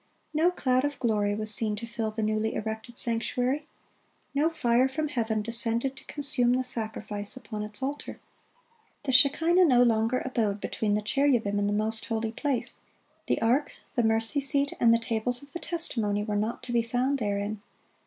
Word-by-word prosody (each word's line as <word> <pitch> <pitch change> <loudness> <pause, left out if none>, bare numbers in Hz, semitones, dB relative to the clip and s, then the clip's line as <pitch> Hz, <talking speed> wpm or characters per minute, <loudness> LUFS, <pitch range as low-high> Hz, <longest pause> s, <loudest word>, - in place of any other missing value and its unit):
No 320 +3 +3
cloud 255 -7 0
of 290 0 -2
glory 210 -4 0
was 215 0 +1
seen 210 0 0
to 210 - -6
fill 230 -1 -3
the 220 0 -4
newly 215 +1 -1
erected 220 +2 -5
sanctuary. 250 +5 -1 0.7
No 295 +3 +2
fire 250 -5 +2
from 305 +2 -3
heaven 225 -6 -1
descended 230 +3 0
to - - -10
consume 280 -4 +3
the 255 +1 +1
sacrifice 215 -3 -3
upon 215 -4 -7
its 210 +4 -5
altar. 280 +2 -5 0.8
The 270 - -1
shekinah 325 +7 +5
no 250 -5 +5
longer 230 +1 +1
abode 220 -6 -1
between 205 0 -1
the 210 - -2
cherubim 225 -4 +1
in 205 - 0
the - - 0
most 220 +2 -1
holy 225 -1 -2
place; 270 0 -2 0.5
the - - +1
ark, 265 +6 +1 0.2
the 240 - +1
mercy 225 +5 +1
seat, 280 +1 +3
and 235 - +5
the 230 - +5
tables 230 +2 +1
of 285 - -12
the 345 - -5
testimony 225 -14 +1
were 210 -1 -3
not 215 +4 -2
to 245 - -6
be 235 - +3
found 250 +4 -1
therein. 205 -1 -2
235 Hz, 180 wpm, -27 LUFS, 215-270 Hz, 0.8 s, shekinah